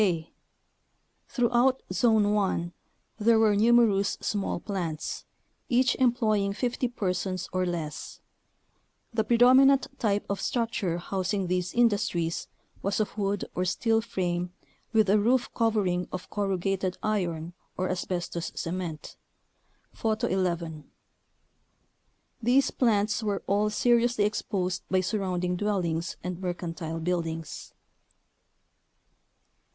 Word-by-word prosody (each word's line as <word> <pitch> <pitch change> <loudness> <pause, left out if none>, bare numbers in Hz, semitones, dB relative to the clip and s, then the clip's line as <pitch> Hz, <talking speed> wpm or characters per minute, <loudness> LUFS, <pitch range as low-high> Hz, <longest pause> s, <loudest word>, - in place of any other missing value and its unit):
k. 170 -6 0 0.9
Throughout 245 +2 +2
Zone 210 +1 +3
1 185 -4 0 0.5
there 225 +1 +4
were 220 -2 +4
numerous 215 -2 +4
small 200 -4 -2
plants, 175 -6 -4 0.4
each 255 +1 +3
employing 220 -6 +2
50 245 +3 -1
persons 185 -5 -2
or 185 0 +1
less. 165 -4 -5 0.9
The 220 -1 +1
predominant 255 +4 +6
type 205 -2 +1
of 200 - -3
structure 225 -8 -1
housing 190 +2 -2
these 180 0 -1
industries 200 -8 +1 0.3
was 200 +2 -1
of 215 - -1
wood 200 -1 -1
or 180 - -1
steel 225 +5 +1
frame 180 -4 -2 0.4
with 220 -3 +4
a 205 +2 +4
roof 245 +4 +2
covering 205 -6 +1
of 185 - -7
corrugated 195 -2 -1
iron 175 -6 -1 0.2
or 185 - 0
as 185 -1 -2
bestos 175 -2 -3
cement 170 -2 -5 0.8
(Photo 220 -1 -1
11). 170 -5 -2 1.5
These 250 +4 +3
plants 215 -3 +1
were 205 -2 -2
all 205 +2 +2
seriously 235 0 +2
exposed 195 -3 -1
by 185 0 +3
surrounding 180 -2 -1
dwellings 180 -4 -1
and 180 0 -4
mercantile 165 -3 -4
buildings. 165 -2 -3
195 Hz, 110 wpm, -27 LUFS, 180-220 Hz, 1.5 s, predominant